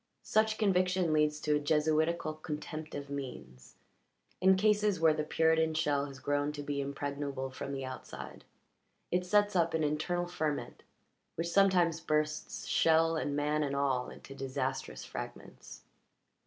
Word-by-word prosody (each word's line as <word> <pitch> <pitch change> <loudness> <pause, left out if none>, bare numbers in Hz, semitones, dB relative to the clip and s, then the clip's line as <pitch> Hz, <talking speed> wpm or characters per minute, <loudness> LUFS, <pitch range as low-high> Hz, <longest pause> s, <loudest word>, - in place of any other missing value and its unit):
Such 215 0 +2
conviction 185 -4 +2
leads 150 0 +2
to 150 -1 +2
a - - -1
Jesuitical 155 +2 +1
contempt 155 0 -6
of 140 0 -5
means; 70 - -7 0.7
in 190 +1 +6
cases 210 -1 +2
where 160 -1 +5
the 155 - -1
Puritan 160 0 +2
shell 145 -2 +1
has 135 -1 -10
grown 145 +2 0
to 145 -1 -6
be 145 -1 -2
impregnable 140 -1 -4
from 135 - -6
the 135 -1 -4
outside 130 -1 -8 0.7
it 180 0 0
sets 205 +1 +3
up 165 -2 +2
an 160 - +1
internal 155 +4 0
ferment 155 -4 -3 0.5
which 170 +1 -2
sometimes 175 -4 +3
bursts 155 -1 -1
shell 165 0 +3
and 145 -2 -1
man 150 +1 +1
and 140 -2 -1
all 135 -3 0
into 135 - -11
disastrous 130 - -3
fragments. - - -9
155 Hz, 145 wpm, -32 LUFS, 140-170 Hz, 0.7 s, in